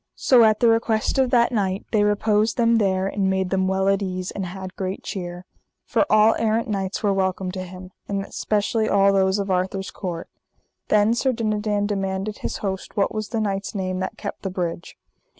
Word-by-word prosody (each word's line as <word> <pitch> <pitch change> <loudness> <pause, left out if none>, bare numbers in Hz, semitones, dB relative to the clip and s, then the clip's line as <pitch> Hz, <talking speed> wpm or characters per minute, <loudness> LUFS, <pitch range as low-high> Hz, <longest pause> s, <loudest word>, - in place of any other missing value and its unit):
So 250 -3 +5
at 215 -1 +3
the 235 - +5
request 225 +2 +2
of 260 -1 +3
that 240 -1 +3
knight 195 -4 -1
they 215 -2 +3
reposed 210 +1 +2
them 230 -1 +3
there, 190 -2 +1
and 195 0 0
made 190 -1 0
them 190 -1 +1
well 190 0 +1
at 195 0 +2
ease, 185 -1 -3
and 195 -2 -4
had 185 +1 -8
great 190 0 -4
cheer. 180 -1 -6 0.4
For - - +1
all 215 +1 +6
errant 225 0 +1
knights 195 -2 -3
were 205 -1 +3
welcome 190 -1 -1
to 185 0 -5
him, 185 0 -9 0.2
and 200 -1 -2
specially 215 +1 0
all 200 0 +4
those 190 0 +2
of 200 -1 -2
Arthur's 190 +1 -1
court. 175 -4 -5 0.6
Then 210 +1 +4
Sir 260 +2 +1
Dinadan 210 -2 -1
demanded 195 0 -2
his - - -3
host 190 +1 -4
what 200 - +1
was 215 -1 -4
the 230 - -2
knight's 200 -1 -2
name 185 -1 -2
that 190 - -4
kept - - -6
the 195 - -3
bridge. 175 -2 -4
195 Hz, 200 wpm, -23 LUFS, 190-215 Hz, 0.6 s, all